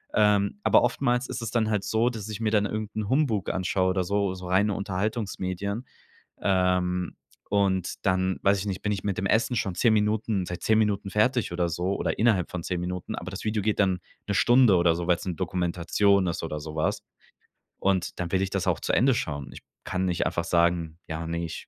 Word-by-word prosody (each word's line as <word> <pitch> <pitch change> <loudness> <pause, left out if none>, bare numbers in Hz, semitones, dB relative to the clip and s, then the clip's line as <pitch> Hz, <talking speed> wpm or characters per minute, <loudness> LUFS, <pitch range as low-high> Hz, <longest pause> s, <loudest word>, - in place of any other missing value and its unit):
Ähm. 105 - +3
Aber - - +5
oftmals 125 -2 +1
ist - - -5
es - - -4
dann 110 -2 +1
halt 105 -2 0
so, 115 +4 +1
dass 110 -3 -6
ich 105 0 -5
mir 110 -1 +1
dann 105 -1 +3
irgend 110 0 -4
'n 105 -2 -3
Humbug 130 -8 +1
anschaue 95 0 0
oder 95 0 0
so, 100 -1 0
so 90 -1 -8
reine 100 +3 +2
Unterhaltungsmedien. 100 +1 -3 0.6
Ähm, 90 -2 +1 0.3
und 95 -3 0
dann 95 0 +1
weiß 100 0 +3
ich 100 - -4
nicht, 95 -2 -3
bin 105 - -1
ich 100 - -4
mit 100 -3 -1
dem 95 - -1
Essen 115 +4 +2
schon 95 -5 -1
10 115 -3 +4
Minuten 105 -2 +1
seit 90 -1 -6
10 110 0 +3
Minuten 100 -2 0
fertig 110 -1 +1
oder 85 0 0
so, 90 +4 -1
oder - - -2
innerhalb 110 -6 +2
von 90 -2 -4
10 90 -2 -2
Minuten, 90 0 -4
aber 90 - -6
das 95 - -7
Video 105 -1 0
geht 110 0 0
dann 95 -3 +2 0.3
'ne 100 - 0
Stunde 120 -3 +5
oder 85 -1 +3
so, 85 0 -4
weil's 90 +1 +1
'ne 90 - -2
Dokumentation 90 +2 +1
ist 85 - -3
oder 75 -2 -4
so 75 +1 -7
was. 80 - 0 0.8
Und 95 -2 0
dann 85 -1 -3
will 95 - +3
ich 95 - -2
das 95 -2 -2
auch - - +1
zu - - -1
Ende 130 0 +4
schauen. 70 - -3
Ich - - -11 0.2
kann 95 0 -2
nicht 90 -2 0
einfach 85 - -1
sagen: 85 -1 +1
„Ja, 80 +1 -4
ne, 85 0 -2
ich 80 - -7
95 Hz, 220 wpm, -26 LUFS, 90-105 Hz, 0.8 s, Aber